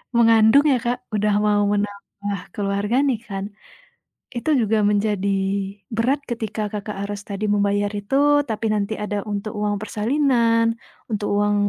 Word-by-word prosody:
mengandung 230 +3 +6
ya 265 - +4
Kak, 245 +1 -3
udah 210 0 +2
mau 210 -1 +3
menambah 205 -1 -4
keluarga 200 +2 -1
nih 275 -4 +1
kan, 195 -2 -4 0.9
itu 240 - -5
juga 220 0 +2
menjadi 200 -1 +1 0.6
berat 260 +6 +1
ketika 220 -2 -3
Kakak, 210 0 -5
harus 205 0 -4
tadi 200 +1 -4
membayar 205 0 +1
itu 205 +6 -2 0.3
tapi 220 0 -2
nanti 210 0 0
ada 210 0 -3
untuk 205 0 -4
uang 210 0 0
persalinan, 230 0 +1 0.3
untuk 210 -1 -2
uang 205 0 +2
210 Hz, 140 wpm, -22 LUFS, 205-230 Hz, 0.9 s, mengandung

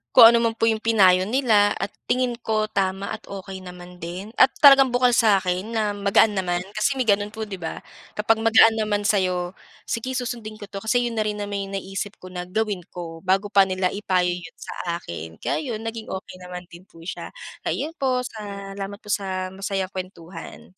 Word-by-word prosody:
kung 230 0 +11
ano 235 - +4
man 225 - -3
po - - -4
yung 225 -1 +3
pinayo 190 -4 +4
nila 220 -5 +3
at 195 +1 -3 0.2
tingin 250 -2 0
ko 215 -1 -1
tama 195 0 -1
at 220 - -7
okey 195 -1 -7
naman 180 -1 -11
din 180 +6 -6
at - - +9 0.2
talagang 275 -2 +9
bukal 245 0 +3
sa 210 -5 +4
akin 185 +5 -2
na 215 -2 +1
magaan 205 +2 +3
naman. 175 -1 -1
Kasi 215 +6 0
may 260 - +1
ganun 205 -1 +1
po, 220 - -3
di 195 -3 -6
ba? 165 - -6 0.3
Kapag 220 +1 +2
magaan 225 0 +6
naman 205 -1 0
sa'yo, 185 -3 +1 0.3
"Sige, 255 +3 -3
susundin 235 -3 -4
ko 205 0 -11
'to," 195 - -5
kasi 245 +4 +1
yun 230 -2 -2
na - - +3
rin 210 - -1
naman 205 -1 -3
yung 195 - -6
naisip 195 +1 -4
ko 185 0 -12
na 180 0 -5
gawin 210 0 -1 0.2
ko, 165 -2 -6
bago 195 +2 +2
pa 195 -2 +6
nila 185 -1 0
ipayo 185 -3 +1
yun 175 -1 -7
sa 170 -1 -5
akin. 80 -1 -7
Kaya - - -2 0.2
yun, 220 - -7
naging 225 0 -5
okey 190 -1 -6
naman 180 0 -8
din 175 +3 -14
po 165 - -16
siya. 175 - -6 0.3
Kaya - - -2
yun 315 +3 -4
po, 255 -2 +1
salamat 200 -3 -6
po 210 - -5
sa 185 -2 -2
masayang 195 0 -3
kuwentuhan. 180 -3 -8
200 Hz, 205 wpm, -23 LUFS, 185-220 Hz, 0.3 s, kung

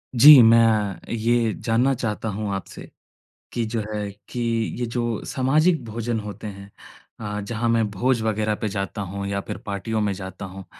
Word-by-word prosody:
जी, 140 +2 +10
मैं 110 -4 +3
ये 115 0 +1
जानना 120 +4 +1
चाहता 110 -2 -3
हूँ 105 0 -3
आपसे, 95 - -8 0.6
कि 120 - -1
जो 110 0 -2
है 105 -1 -3 0.2
कि, 125 - -5 0.4
ये 120 - 0
जो 120 -1 -2
सामाजिक 155 +6 +2
भोजन 115 +1 -3
होते 105 0 -7
हैं। 100 -1 -9 0.5
अ, 105 -1 -4
जहाँ 115 +3 -2
मैं 115 -2 +2
भोज 120 +4 +1
वग़ैरह 110 -1 0
पे 110 - 0
जाता 100 0 -4
हूँ 100 +1 -5
या 100 0 -2
फ़िर - - -6
पार्टियों 105 +2 -2
में 105 -1 0
जाता 95 0 -7
हूँ। 95 0 -10
110 Hz, 170 wpm, -23 LUFS, 100-120 Hz, 0.6 s, जी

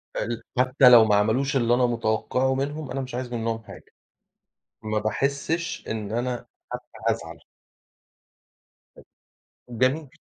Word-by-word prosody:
ال 115 +1 -3
حتى 130 0 +5
لو 115 -2 +8
معملوش 110 +7 +2
اللي 120 -1 +2
أنا 125 0 +3
متوقعه 120 +3 0
منهم 145 +1 -3
أنا 135 +1 -2
مش 130 -2 -6
عايز 125 -1 -4
منهم 115 -1 -2
حاجة. - - -12 1.0
ما 110 0 -1
باحسش 140 +9 -2
إن 105 -2 -4
أنا 120 +1 -2 0.3
حتى - - -5 0.3
هازعل. - - -3 2.3
جميل. 130 +5 0
125 Hz, 115 wpm, -25 LUFS, 115-135 Hz, 2.3 s, لو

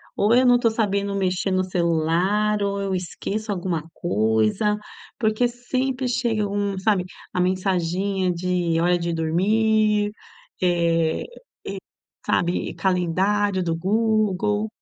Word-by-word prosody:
Ou 210 +3 +3
eu 255 +1 +5
não 245 - +6
estou 240 -1 +3
sabendo 200 -2 -1
mexer 190 0 0
no 185 0 +2
celular 180 +4 +1
ou 200 0 -1
eu 195 -1 -2
esqueço 205 +4 -4
alguma 175 -4 -2
coisa, 110 - +1 0.4
porque 220 +2 +2
sempre 255 +2 -2
chega 225 -4 0
um 200 -1 -2
sabe, 190 -1 +1 0.3
a - - -1
mensaginha 185 0 0
de 175 -1 0
hora 175 +1 +3
de 170 0 -2
dormir, 210 +5 +2 0.5
eh, 170 -2 +1
e - - -10 1.0
sabe, 175 +1 0
calendário 190 +2 +1
do 165 -1 0
Google. 210 +1 +1
195 Hz, 120 wpm, -23 LUFS, 175-215 Hz, 1.0 s, não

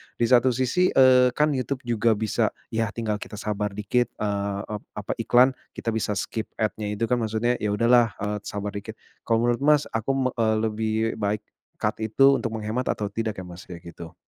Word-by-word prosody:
di - - -1
satu 125 +1 +4
sisi, 130 +9 +2
eee, 125 -1 +6
kan 150 0 +3
YouTube 135 0 -2
juga 115 -2 +2
bisa, 110 0 0 0.2
ya 115 0 0
tinggal 110 -3 -2
kita 105 - -8
sabar 105 -1 -3
dikit 105 +4 +1
eee, 100 -1 -2 0.3
apa - - -4
iklan 125 +2 +5 0.2
kita 115 - -2
bisa 110 -2 -1
skip 110 +3 -3
ad-nya 110 -1 -2
itu 115 - -3
kan 125 - +3
maksudnya 115 +2 0
ya 105 -1 0
udahlah, 115 +1 +4
eee, 105 0 -2
sabar 105 0 -4
dikit 105 +2 -7 0.3
kalau 115 0 +2
menurut, 120 -1 +1
Mas, 150 0 +5
aku, 130 +3 0
eee, 110 -1 +3
lebih 110 0 -1 0.3
baik 105 0 -1 0.4
cut - - 0
itu 135 +5 +5
untuk 115 -2 -3
menghemat 110 +3 -2
atau 105 - -1
tidak 110 +1 -2
ya, - - -6
Mas, 90 +1 -11
kayak 85 -2 -9
gitu? 85 0 -10
110 Hz, 190 wpm, -25 LUFS, 105-125 Hz, 0.4 s, eee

